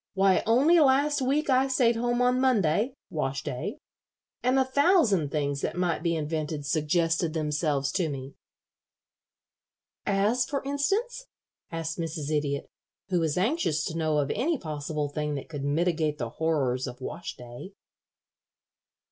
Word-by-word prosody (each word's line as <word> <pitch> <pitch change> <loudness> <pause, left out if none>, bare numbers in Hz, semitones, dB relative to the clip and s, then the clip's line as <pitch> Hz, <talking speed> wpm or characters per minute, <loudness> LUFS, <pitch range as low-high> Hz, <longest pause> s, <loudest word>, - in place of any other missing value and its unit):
Why, 190 -1 +4
only 280 +10 +5
last 285 0 +3
week 280 +4 +1
I 265 0 +3
stayed 250 -3 +3
home 240 +1 +1
on 250 +1 +2
Monday 225 - +2 0.2
wash 135 -3 -2
day 125 - -4 0.6
and 255 +2 +2
a 265 - +4
thousand 260 - +3
things 140 -1 -1
that - - -2
might 175 -3 0
be 170 0 0
invented 155 -1 -3
suggested 165 +2 +1
themselves 150 -2 0
to 175 -2 0
me." 135 -1 -6 1.7
"As, 210 +5 +2
for 275 +2 -3
instance?" 410 - -1 0.4
asked 165 0 -4
Mrs. 155 -3 -3
Idiot, 140 -1 -1 0.4
who 180 -2 +2
was 160 -1 0
anxious 185 - +1
to 160 - -4
know 155 -2 +1
of 145 -1 0
any 300 +8 0
possible 150 - -3
thing 150 0 -3
that 140 - -6
could 145 -4 -5
mitigate 155 +1 0
the 120 -5 -3
horrors 135 -5 0
of 125 - -8
wash 170 +6 -6
day. 125 +10 -10
165 Hz, 145 wpm, -27 LUFS, -, 1.7 s, only